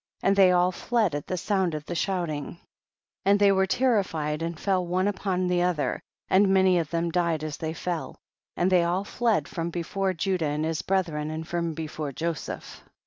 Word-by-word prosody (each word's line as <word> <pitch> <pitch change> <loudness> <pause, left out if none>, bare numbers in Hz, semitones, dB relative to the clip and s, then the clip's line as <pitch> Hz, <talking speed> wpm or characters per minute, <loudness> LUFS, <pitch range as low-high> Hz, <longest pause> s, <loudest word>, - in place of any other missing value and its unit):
45. - - 0
And 195 - +4
they 190 -2 +6
all 180 0 +3
fled 215 -1 0
at 145 -1 -4
the 185 - -2
sound 185 -3 0
of 150 -1 -6
the 175 - -4
shouting, 170 -4 -2 0.7
and 200 +1 +4
they 200 -1 +5
were 190 0 +2
ter 245 0 +3
lified 150 -4 -3
and 165 -1 -3
fell 190 -2 +1
one 180 +2 0
upon 190 -2 -1
the 180 0 +1
other, 165 -7 0 0.3
and 195 +1 +4
many 190 -2 +4
of 160 -2 -2
them 170 0 -1
died 170 -3 0
as 155 -2 -4
they 160 0 -4
fell, 175 -2 -4 0.4
and 180 +2 +2
they 180 -2 +5
all 175 +3 0
fled 230 +1 0
from 165 -1 -3
before 185 +3 -2
Judah 180 -2 0
and 150 +1 -1
his 160 -1 -1
brethren 165 -6 -1
and 160 +1 -5
from 170 -2 -2
before 155 -2 -4
Jo 165 +5 -1
seph. 150 - -8
175 Hz, 205 wpm, -26 LUFS, 160-190 Hz, 0.7 s, they